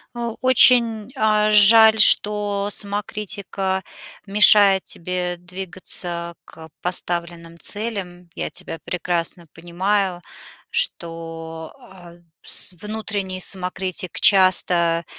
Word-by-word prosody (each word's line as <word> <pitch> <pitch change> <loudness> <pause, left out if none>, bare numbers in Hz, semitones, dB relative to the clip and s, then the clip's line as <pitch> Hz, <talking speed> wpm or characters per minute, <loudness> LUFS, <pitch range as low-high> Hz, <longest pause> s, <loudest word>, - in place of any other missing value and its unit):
А, 235 -1 -5
очень, 240 -3 +3
э, 215 -3 +1
жаль, 220 +1 +6
что 205 -1 +3
самокритика 200 -2 -1 0.4
мешает 200 -1 +5
тебе 180 0 -4
двигаться 175 -1 -4
к 160 0 -14
поставленным 170 -1 -4
целям. 195 -5 -4
Я - - -5
тебя 165 - -8
прекрасно 175 -1 -3
понимаю, 180 +2 -3 0.5
что, 165 -1 -4 0.2
э, 175 -2 -16 0.2
с - - +2
внутренний 205 0 -5
самокритик 185 -1 -2
часто, 175 -3 +3
185 Hz, 85 wpm, -19 LUFS, 175-210 Hz, 0.5 s, жаль